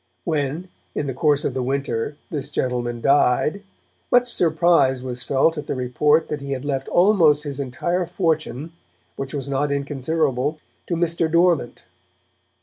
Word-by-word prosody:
When, 155 +2 -2 0.3
in 150 - -1
the 135 - -3
course 145 +2 +2
of - - -1
the 130 - -2
winter, 135 0 -2
this 145 -3 -3
gentleman 120 -4 -2
died, 140 - +2 0.5
much 245 0 +3
surprise 160 -6 +3
was 125 -1 -4
felt 150 +5 +1
at 150 - -8
the - - -2
report 145 +5 +2
that 150 -2 -4
he 140 0 -3
had 130 +1 -5
left 135 -2 -2
almost 175 -6 +4
his 145 -2 -5
entire 170 +7 -2
fortune, 160 -4 -2 0.4
which 135 +2 -5
was 140 -1 -4
not 140 +1 0
inconsiderable, 140 0 -1 0.3
to 175 - -1
Mr. 165 -1 0
Dormant. 170 -6 +2
145 Hz, 150 wpm, -22 LUFS, 135-165 Hz, 0.5 s, almost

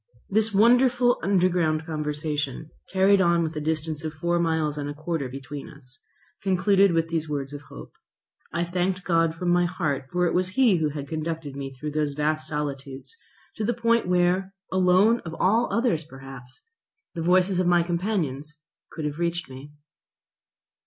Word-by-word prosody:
This 220 +2 +2
wonderful 245 +3 +4
underground 175 -5 +1
conversation, 150 -2 -3 0.2
carried 195 +1 +4
on 170 -2 +3
with 160 0 -3
a 155 - -3
distance 155 0 -2
of 155 -1 -4
four 170 +3 0
miles 160 -3 0
and 145 -1 -4
a 145 - -6
quarter 155 -3 -3
between 135 +2 -8
us, 130 +1 -14 0.4
concluded 195 +1 +3
with 165 -1 +1
these 160 -2 -2
words 140 -1 -3
of 145 - -7
hope. - - -11 0.6
I 170 - -1
thanked 180 +2 -1
God 165 -2 +2
from 175 +1 -2
my 175 0 +3
heart, 150 -7 -2
for 180 0 +1
it 170 - +1
was 185 +1 0
He 240 -8 +5
who 155 -2 0
had 145 -1 -6
conducted 160 -2 -4
me 135 -1 -5
through 150 +3 -6
those 150 -1 -1
vast 155 +1 -1
solitudes 140 - -5 0.4
to 220 - -2
the 235 +2 0
point 230 -2 +2
where, 180 +2 +1 0.2
alone 190 +5 +4
of 165 -1 -8
all 225 +6 +2
others 230 -9 +1
perhaps, 135 -3 -12 0.5
the 170 - -4
voices 185 +2 +3
of 185 - +1
my 175 -1 +4
companions 170 -5 -2 0.4
could 155 - -5
have 150 +1 -4
reached 170 -4 -2
me. 135 +3 -10
165 Hz, 170 wpm, -25 LUFS, 150-185 Hz, 0.6 s, He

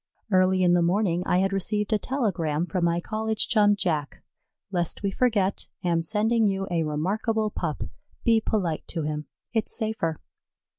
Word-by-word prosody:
Early 185 0 +4
in 175 -1 +5
the 175 - +4
morning 175 0 +2
I 180 - +3
had 195 0 +1
received 210 +3 0
a 215 - +3
telegram 175 - -1
from 180 -1 -1
my 170 0 +2
college 220 +3 -1
chum 205 -2 +4
Jack: 155 -7 -2 0.5
"Lest 175 +1 -2
we 200 - +1
forget. 205 -4 +1 0.2
Am 170 -2 +2
sending 220 +4 +2
you 195 -1 -1
a 170 -1 +1
remarkable 210 +8 0
pup. 165 -6 -3 0.4
Be 225 -1 +4
polite 175 -8 -1
to 165 -3 -2
him; 150 0 -3 0.3
it's 225 -2 +1
safer." 220 -8 -1
190 Hz, 160 wpm, -26 LUFS, 170-215 Hz, 0.5 s, in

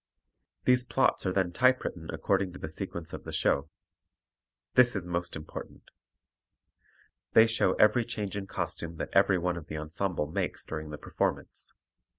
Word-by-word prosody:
These 125 0 +5
plots 125 -5 +1
are - - +2
then 95 -2 +1
typewritten 125 -7 +1
according 95 -2 0
to - - -8
the 80 - -6
sequence 85 0 -5
of - - -6
the - - -7
show. 70 +2 +1 1.0
This 125 -2 +5
is 95 -3 -2
most 85 0 -3
important. 80 0 -9 1.4
They 110 - +8
show 115 0 +2
every 110 +3 +4
change 105 -5 -4
in 100 -1 -4
costume 85 -2 -4
that - - -4
every 95 -1 +5
one 90 0 -1
of 80 - -8
the 75 - -5
ensemble 80 +2 -2
makes 75 - -3
during 80 -1 -5
the 75 - -6
performance. - - -3
90 Hz, 160 wpm, -29 LUFS, 80-105 Hz, 1.4 s, They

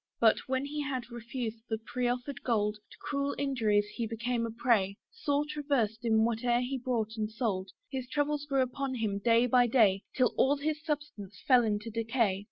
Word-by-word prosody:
But, 225 -2 +5
when 260 +1 0
he 295 +1 -3
had 260 -4 -4
refused 235 -1 -5
the 220 - 0
proffered 245 +3 -3
gold, 210 -3 0
To - - -15
cruel 280 -1 -1
injuries 225 -7 +2
he 230 -2 -2
became 230 +1 -1
a - - -5
prey, 220 -4 +1
Sore 295 -10 0
traversed 275 -7 -1
in 220 -1 +3
whate'er 240 +1 +1
he 260 +1 -2
bought 230 -3 -2
and 215 -1 -1
sold: 215 -5 -2 0.2
His 260 -2 -4
troubles 290 +1 -1
grew 270 -2 +3
upon 260 +1 -3
him 215 -4 -1
day 230 +3 +4
by 245 0 +4
day, 215 -6 +4
Till 255 -3 +3
all 280 +2 +4
his 300 +1 -2
substance 290 - -5
fell 250 -3 +6
into 215 +1 -1
decay. 225 -3 +1
240 Hz, 180 wpm, -30 LUFS, 220-270 Hz, 0.2 s, fell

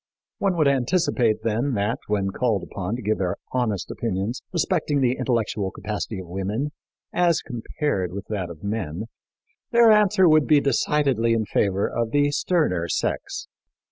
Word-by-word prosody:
One 190 -3 +1
would 155 -3 +4
anticipate, 130 -4 +1
then, 115 +4 0
that, 105 +4 0
when 100 -2 0
called 115 -2 0
upon 100 +3 -4
to 125 - -7
give 110 +1 0
their 90 -2 0 0.2
honest 120 -7 -1
opinions 110 +2 -2
respecting 160 -4 0
the 130 -1 +2
intellectual 110 -6 0
capacity 105 +2 -4
of 95 - -6
women, 100 +10 -2 0.4
as 175 -2 +3
compared 115 - -2
with 100 +1 -6
that 95 -5 -3
of 85 -1 -11
men, 100 -4 -3 0.7
their 235 -2 +6
answer 205 -3 +5
would 155 -2 +5
be 150 - +6
decidedly 135 -4 +1
in 110 -1 0
favor 100 -1 +1
of 115 -1 -2
the 145 +3 +2
sterner 145 - +1
sex. - - -2
115 Hz, 155 wpm, -24 LUFS, 100-145 Hz, 0.7 s, their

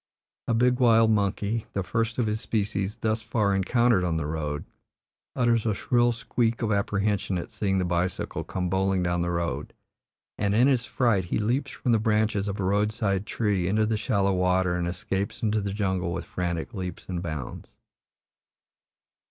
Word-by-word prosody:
A 115 - +2
big 125 +2 +3
wild 115 -2 +5
monkey, 105 +2 0
the 100 - -1
first 115 +4 -1
of 120 - +1
his 110 +1 -1
species 100 -2 -1
thus 110 0 -1
far 110 -3 0
encountered 110 +1 +3
on 85 -2 0
the 80 - -2
road, 75 -1 -3 0.7
utters 120 -3 +2
a 110 -3 0
shrill 120 +2 +2
squeak 115 0 -1
of 110 - 0
apprehension 100 -1 0
at 85 - -6
seeing 100 -3 0
the 95 - +1
bicycle 90 +1 -1
come 90 -1 -3
bowling 95 0 +1
down 85 0 0
the 85 - 0
road, 85 0 -2 0.7
and 100 -1 +1
in 120 +3 +5
his 130 -3 +1
fright 115 -8 +1
he - - -1
leaps 120 +6 0
from 125 - -2
the 115 - +4
branches 105 -2 +1
of 100 +1 -3
a - - 0
road 100 +3 +2
side 100 -3 -1
tree 100 -6 0
into 110 +3 +2
the 110 +1 0
shallow 100 -3 +1
water 90 0 +2
and 90 -1 -1
escapes 95 +4 -3
into 110 -1 +1
the 100 0 -3
jungle 95 -4 -1
with - - -4
frantic 85 +3 -3
leaps 90 -4 -5
and 90 -2 -3
bounds. 75 -7 -6
100 Hz, 180 wpm, -26 LUFS, 90-110 Hz, 0.7 s, wild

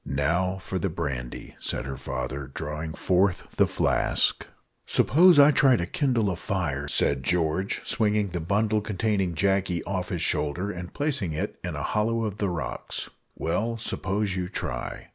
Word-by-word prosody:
"Now 85 +7 0
for 95 0 -4
the 95 - -1
brandy," 70 -7 -5
said - - -3
her 70 0 -4
father, 65 +2 -5
drawing 75 +1 -4
forth 95 0 +2
the - - +5
flask. - - +1 0.4
"Suppose 170 - +6
I 145 +1 +8
try 135 -2 +5
to 85 - -1
kindle 115 - +1
a - - -2
fire," 75 -7 -2
said 70 -1 +2
George, 85 +5 0
swinging 105 -2 +2
the 90 0 -3
bundle 105 +5 +1
containing 100 -3 -1
Jacky 95 -1 +1
off 95 -1 -3
his 90 -4 -2
shoulder, 90 +7 0
and 90 -2 -7
placing 140 - -1
it 75 - -4
in - - -4
a - - -4
hollow 115 +2 0
of 105 -2 -4
the 100 -3 0
rocks. 85 -3 -4 0.2
"Well, 110 +8 -1
suppose 100 -3 -1
you 90 -1 -3
try." 60 -9 -5
95 Hz, 160 wpm, -26 LUFS, 80-105 Hz, 0.4 s, I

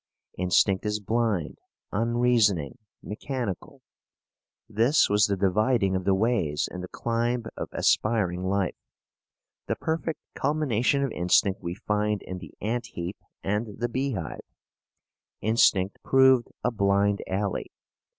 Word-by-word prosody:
Instinct 90 +1 +2
is 105 0 -1
blind, 105 -5 -1 0.3
unreasoning, 115 - +2 0.2
mechanical. 115 -2 -5 0.8
This 115 +8 +3
was 105 0 +4
the 100 -1 -1
dividing 100 +1 +2
of 95 -1 -2
the 95 - +3
ways 95 -9 +1
in 90 - -6
the 90 - -6
climb 120 +3 -1
of - - -5
aspiring 100 -5 +1
life. 95 0 0 0.9
The - - 0
perfect 160 0 -2
culmination 140 -2 +1
of 135 - -1
instinct 90 +2 +2
we 85 +1 -4
find 105 0 -1
in 95 0 -6
the 85 - -12
ant 120 +3 -2
heap 85 +3 -6 0.3
and 105 +1 -2
the 120 +2 -1
beehive. 120 - -3 1.0
Instinct 100 -3 +2
proved 130 -2 +4 0.2
a 125 - +1
blind 100 -1 +2
alley. 100 0 -2
105 Hz, 120 wpm, -26 LUFS, 95-120 Hz, 1.0 s, was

